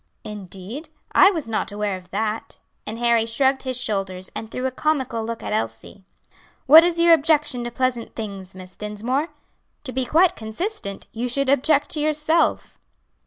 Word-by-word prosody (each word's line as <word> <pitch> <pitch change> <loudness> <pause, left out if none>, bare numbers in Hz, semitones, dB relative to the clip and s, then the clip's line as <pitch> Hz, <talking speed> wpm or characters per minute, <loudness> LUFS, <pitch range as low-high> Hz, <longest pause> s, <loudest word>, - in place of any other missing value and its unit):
"Indeed! 205 - -8 0.2
I 380 - +7
was 325 - -3
not 220 -1 -2
aware 205 -1 -2
of 180 -1 -12
that." 220 +2 -3 0.3
And 220 - -4
Harry 235 -1 +2
shrugged 265 +3 +2
his 255 -1 -2
shoulders, 195 -4 -2
and 220 - -6
threw 250 +3 -4
a 260 - 0
comical 260 -5 -1
look 230 0 -5
at - - -3
Elsie. 115 - -4 0.6
"What 315 +4 +9
is 340 -1 0
your 340 0 +7
objection 300 -5 +2
to 240 - -4
pleasant 250 -1 -2
things, 195 -4 -6
Miss 185 0 -11
Dinsmore? 230 +8 -2 0.6
To 265 - -6
be 260 0 -1
quite 350 +5 +4
consistent 220 - -5
you 240 +2 -3
should 275 +2 0
object 285 +2 +3
to 305 - 0
yourself." 305 +2 +1
240 Hz, 165 wpm, -22 LUFS, 210-295 Hz, 0.6 s, What